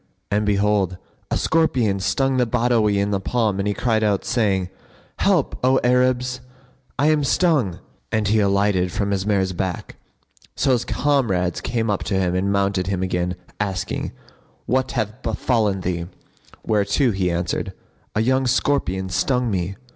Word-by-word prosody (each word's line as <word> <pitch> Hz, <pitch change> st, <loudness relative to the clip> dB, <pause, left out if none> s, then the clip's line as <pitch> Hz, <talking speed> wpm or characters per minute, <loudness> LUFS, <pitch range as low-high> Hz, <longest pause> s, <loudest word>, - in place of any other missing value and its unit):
And 105 Hz, +1 st, +1 dB
behold, 100 Hz, -2 st, +1 dB, 0.3 s
a -, -, 0 dB
scorpion 125 Hz, -11 st, +1 dB
stung 130 Hz, +8 st, +1 dB
the 125 Hz, -1 st, +2 dB
Badawi 115 Hz, -3 st, +2 dB
in 100 Hz, +1 st, 0 dB
the 100 Hz, -, +1 dB
palm 105 Hz, -1 st, 0 dB
and 100 Hz, -, -1 dB
he 105 Hz, -, 0 dB
cried 110 Hz, -3 st, +1 dB
out, 105 Hz, -2 st, +1 dB
saying, 100 Hz, -6 st, +1 dB, 0.5 s
"Help, -, -, +2 dB
O 130 Hz, +1 st, +4 dB
Arabs! 125 Hz, 0 st, +2 dB, 0.6 s
I 145 Hz, +4 st, +3 dB
am 150 Hz, -1 st, +2 dB
stung;" 140 Hz, -, +2 dB, 0.3 s
and 110 Hz, -2 st, +1 dB
he 110 Hz, +2 st, +3 dB
alighted 100 Hz, -2 st, +2 dB
from 100 Hz, +2 st, -1 dB
his 100 Hz, 0 st, -1 dB
mare's 95 Hz, -3 st, +1 dB
back. 90 Hz, -1 st, -4 dB, 0.6 s
So 135 Hz, -, +1 dB
his 120 Hz, -2 st, +1 dB
comrades 110 Hz, -12 st, 0 dB
came 115 Hz, -3 st, -1 dB
up 100 Hz, -, -1 dB
to 100 Hz, -, -1 dB
him 90 Hz, -2 st, 0 dB
and 95 Hz, +2 st, 0 dB
mounted 100 Hz, -2 st, 0 dB
him 95 Hz, -1 st, -1 dB
again, 90 Hz, -1 st, -1 dB, 0.2 s
asking, 95 Hz, -4 st, -2 dB, 0.5 s
"What 130 Hz, +1 st, 0 dB
hath 110 Hz, 0 st, -3 dB
befallen 110 Hz, -3 st, 0 dB
thee?" 85 Hz, -2 st, -2 dB, 0.6 s
whereto 110 Hz, +4 st, +2 dB
he 95 Hz, -3 st, 0 dB
answered, 85 Hz, 0 st, -2 dB, 0.4 s
"A 110 Hz, -, +2 dB
young 130 Hz, +3 st, +2 dB
scorpion[FN#51] 120 Hz, -8 st, 0 dB
stung 125 Hz, +4 st, +1 dB
me." 95 Hz, 0 st, -2 dB
105 Hz, 155 wpm, -22 LUFS, 95-125 Hz, 0.6 s, O